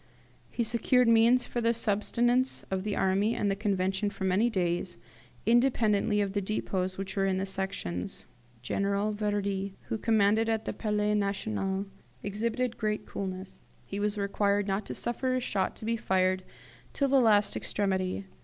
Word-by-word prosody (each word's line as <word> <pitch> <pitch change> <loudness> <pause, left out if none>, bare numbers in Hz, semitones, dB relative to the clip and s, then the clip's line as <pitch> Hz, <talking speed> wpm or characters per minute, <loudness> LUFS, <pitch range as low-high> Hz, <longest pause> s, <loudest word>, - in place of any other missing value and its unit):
He 235 - -1
secured 240 +2 +3
means 230 +2 +5
for 240 - -3
the 230 0 +2
subsistence 240 +4 +1
of 190 -1 -1
the 210 -1 -2
army 195 +4 +2
and - - -3
of 205 - +2
the 200 - -16
Convention 195 0 0
for 200 - -8
many 190 +5 +3
days, 175 - -1 0.5
independently 225 -3 +3
of 195 -1 -1
the 205 - 0
depots 190 -2 -2
which 195 0 -5
were 195 -1 +2
in 190 -1 +1
the 190 - -1
Sections. 190 - -4 0.4
"General 200 +6 0
Verdier, 200 -2 -1 0.2
who 220 - -2
commanded 220 0 +3
at 225 -1 0
the - - -2
Palais 210 -1 0
National, 195 - -1 0.4
exhibited 230 +4 -2
great 215 -1 -1
coolness; 190 -1 -6 0.2
he 200 - -5
was 210 0 -1
required 200 0 +1
not 195 +1 -2
to - - -5
suffer 255 +2 -1
a - - +1
shot 195 -6 -1
to - - -9
be 230 +1 0
fired 185 -2 +1 0.5
till 280 - +1
the 270 -1 +4
last 210 -3 +4
extremity. 190 -1 -1
205 Hz, 165 wpm, -29 LUFS, 195-225 Hz, 0.5 s, means